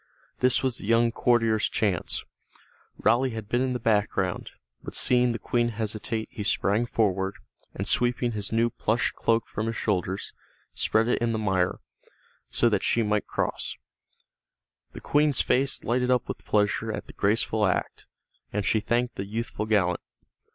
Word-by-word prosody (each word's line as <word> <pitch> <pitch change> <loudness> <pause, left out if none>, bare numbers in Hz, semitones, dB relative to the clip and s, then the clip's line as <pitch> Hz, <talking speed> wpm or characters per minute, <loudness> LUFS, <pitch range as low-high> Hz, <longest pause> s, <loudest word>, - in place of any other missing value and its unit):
This 125 +1 +3
was 130 -3 0
the - - -8
young 115 +1 +4
courtier's 115 -2 +2
chance. 100 -6 0 0.7
Raleigh 125 +1 +2
had 110 -2 -6
been 120 +3 +1
in 130 -1 0
the 125 - -2
background, 105 -3 0 0.3
but - - -7
seeing 125 -1 +3
the 115 - -2
Queen 120 +1 0
hesitate 110 0 -3
he 105 - -5
sprang 105 +4 +1
forward, 95 -3 0 0.4
and - - -3
sweeping 120 0 +1
his 105 -3 -4
new 115 +1 +2
plush 110 +3 0
cloak 115 -1 +1
from 110 +2 -3
his 115 - -2
shoulders, 95 -2 -2 0.4
spread 110 +1 +1
it 120 - +1
in 115 -1 +1
the - - 0
mire, 95 -4 0 0.7
so - - +3
that - - +2
she 115 - +2
might 105 0 0
cross. - - -2 1.2
The - - -9
Queen's 145 -2 +3
face 135 +1 +1
lighted 125 +1 0
up 125 -1 +2
with - - -6
pleasure 105 +2 +1
at - - -5
the - - -12
graceful 105 +1 +1
act, 90 - -2 0.4
and 105 -1 -2
she 110 - +2
thanked 120 +3 -1
the 95 - -3
youthful 110 0 -4
gallant. 95 -5 +2
115 Hz, 165 wpm, -26 LUFS, 105-120 Hz, 1.2 s, young